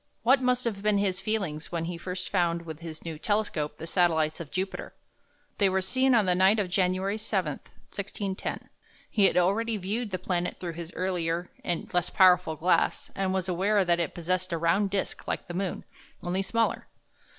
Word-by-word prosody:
What 260 +3 +5
must 250 -1 +1
have 210 -4 -2
been 210 0 +2
his 195 -2 0
feelings 190 -8 -2
when 170 -1 -2
he 175 +1 -4
first 180 +2 -5
found 170 -3 +1
with 160 -2 -8
his 165 -1 -9
"new" 160 -2 -5
telescope 170 -8 -1
the 160 - -7
satellites 165 -3 +2
of 165 -4 -7
Jupiter? 190 +4 -4 0.6
They 200 -2 +5
were 190 0 +1
seen 260 +6 +3
on 220 -3 +4
the 180 - +3
night 190 +4 +5
of 195 -4 -1
January 190 +2 +1
7, 190 -7 0 0.4
1610. 200 -1 -4 0.4
He 205 -3 +4
had - - +3
already 215 +5 +2
viewed 210 +4 -2
the 185 - -2
planet 180 -1 -2
through 175 -2 -4
his 170 +1 -7
earlier 175 -2 -1
and 175 -2 -2
less 175 -2 +1
powerful 180 -4 +5
glass, 170 +4 +1
and 190 -1 -1
was 190 -1 -1
aware 195 +3 +2
that 175 0 +2
it 170 -4 -2
possessed 185 +2 -1
a 170 - 0
round 180 +5 +2
disk 195 0 -3
like - - -2
the 175 - -6
moon, 185 +1 -3 0.4
only 180 +2 0
smaller. 230 +4 0
185 Hz, 190 wpm, -28 LUFS, 170-200 Hz, 0.6 s, What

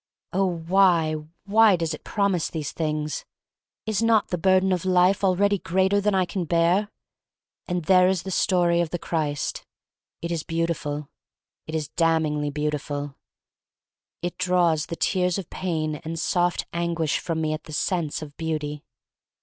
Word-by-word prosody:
Oh, 195 +1 +2
why 170 -1 +3 0.2
— 175 - -48
why 215 0 +5
does 165 -2 -2
it 155 - -8
promise 200 -5 0
these 155 -3 -4
things! 155 -2 -2 0.6
Is 220 -1 0
not 225 -2 +3
the 180 - -1
burden 190 +2 +3
of 180 -2 0
life 185 +1 +3
already 200 +1 +3
greater 190 +4 +1
than 205 0 +1
Lean 185 -1 0
bear? 170 +5 +2 0.8
And 175 -3 -2
there 185 +1 +6
is 185 -2 0
the 190 - -5
story 175 -2 +2
of 170 - -1
the 175 - -2
Christ. 150 -4 -2 0.6
It 170 - -3
is 165 -2 -1
beautiful. 155 -3 -3 0.6
It 160 - -4
is 155 -2 -2
damningly 160 -3 +1
beautiful. 145 -1 -3 1.1
It 175 +1 -4
draws 175 -4 +2
the 165 - -4
tears 180 0 +1
of 190 -4 -7
pain 155 -4 -2
and 165 +2 -6
soft 175 +2 0
anguish 170 -2 0
from 165 -2 -3
me 155 -1 0
at 155 - -6
the 155 - -10
sense 160 -1 -1
of 145 -1 -11
beauty. 150 -2 -3
170 Hz, 160 wpm, -25 LUFS, 155-185 Hz, 1.1 s, there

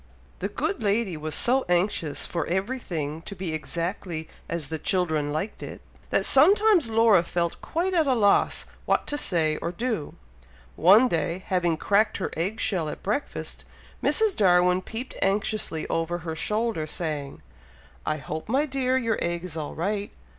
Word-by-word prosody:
The - - -2
good 400 - -2
lady 205 -3 +1
was 155 0 -3
so 255 +2 +3
anxious 175 -4 0
for 170 - -3
everything 175 - -3
to 200 - -8
be 185 -4 -4
exactly 165 0 -4 0.2
as 165 -4 -3
the 160 -1 -3
children 160 -5 0
liked 160 +8 -3
it, - - -7 0.3
that - - +1
sometimes 380 - +5
Laura 220 -4 +5
felt 170 0 -2
quite 360 +3 -1
at 325 -4 +3
a 260 - +3
loss 205 -3 +3 0.2
what - - +2
to 290 - -2
say 160 - +1
or 170 - -3
do. 220 -4 -3 0.6
One 205 +9 +6
day, 170 0 -2
having 175 -3 +1
cracked 205 +5 +2
her 190 - -3
egg 190 +7 -2
shell 170 -6 0
at - - -8
breakfast, 215 +9 -3 0.4
Mrs. 440 -3 +3
Darwin 180 -2 +4
peeped 235 +6 -7
anxiously 195 -4 0
over 165 +1 -1
her 160 -1 -3
shoulder, 210 -2 -1
saying, 150 -4 -4 0.6
"I 155 - -1
hope, 155 +5 -6
my 275 +5 +2
dear! 260 -2 0
your 230 -4 0
egg 170 0 -2
is 180 -4 -6
all 155 -2 -5
right?" 200 +5 -2
185 Hz, 160 wpm, -26 LUFS, 160-225 Hz, 0.6 s, One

